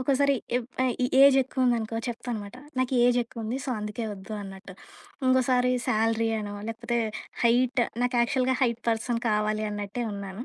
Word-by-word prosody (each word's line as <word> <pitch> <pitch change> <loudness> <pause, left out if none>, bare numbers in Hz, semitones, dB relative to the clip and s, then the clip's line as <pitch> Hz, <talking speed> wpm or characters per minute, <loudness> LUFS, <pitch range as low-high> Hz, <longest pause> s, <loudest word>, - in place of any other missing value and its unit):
ఒకోసారి, 280 +2 +2 0.2
ఎప్ 245 -1 -3
ఆహ్, 255 -1 +2
ఈ - - +3 0.2
ఏజ్ 275 -1 +8
ఎక్కువుందనుకో, 240 -4 0
చెప్తాను 240 -1 -4
మాట. 200 +4 -11 0.2
"నాకు 255 0 0
ఈ - - +3
ఏజ్ 245 0 +3
ఎక్కువుంది. 230 +1 -5
సో, 270 - -3
అందుకే 210 +2 -4
ఒద్దు" 195 +2 -10
అన్నట్టు. 195 0 -10 0.5
ఇంకోసారి 255 -1 +3 0.2
శాలరీ 225 +1 +2
అనో, 205 -1 -5
లేకపోతే 230 +1 -2 0.4
హైట్ 245 +1 +3 0.2
నాకు 245 0 +1
యాక్చువల్‌గా 255 +2 +2
హైట్ 235 -2 +1
పర్సన్ 230 +1 0
కావాలి 215 0 +1
అన్నట్టే 205 +3 -4
ఉన్నాను. 200 +3 -6
235 Hz, 160 wpm, -27 LUFS, 215-250 Hz, 0.5 s, ఏజ్